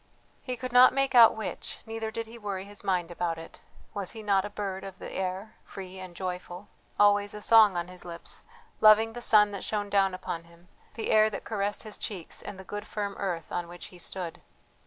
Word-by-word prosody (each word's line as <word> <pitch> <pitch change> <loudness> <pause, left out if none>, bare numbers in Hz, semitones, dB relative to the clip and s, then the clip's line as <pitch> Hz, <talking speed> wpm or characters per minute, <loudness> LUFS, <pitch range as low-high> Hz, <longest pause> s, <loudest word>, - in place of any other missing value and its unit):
He 250 -2 -4
could 255 +1 -5
not 250 +1 +8
make 275 0 +1
out 235 -3 +8
which, 220 - -5
neither 225 0 -4
did 230 +1 -4
he 230 +1 -12
worry 195 -3 -4
his 205 +1 -7
mind 180 -4 0
about 170 -1 -2
it, 165 - -11 0.3
was 200 -3 -4
he 220 -1 -8
not 200 -2 +2
a - - -5
bird 195 -2 -4
of 195 -1 -8
the - - -8
air 190 +3 -4
free 190 -1 -9
and 185 -2 -9
joyful, 180 +1 -6 0.3
always 205 0 +4
a - - -6
song 215 -4 +6
on 175 0 -2
his 180 0 -8
lips, 170 -1 -9 0.4
loving 220 +1 +6
the 240 - -7
sun 210 -3 +6
that 200 - -6
shone 205 -1 -2
down 195 -2 +3
upon 170 -2 -5
him, 170 +1 -21 0.3
the 225 - -2
air 215 0 +6
that 210 - -6
caressed 205 -2 -2
his 215 -2 -6
cheeks, 185 -6 -4
and 195 - -8
the 190 - -9
good 205 +2 -6
firm 205 -1 -3
earth 175 -5 -3
on 175 -1 -2
which 175 +1 -9
he 180 - -12
stood? 175 -1 -5
200 Hz, 220 wpm, -28 LUFS, 180-215 Hz, 0.4 s, not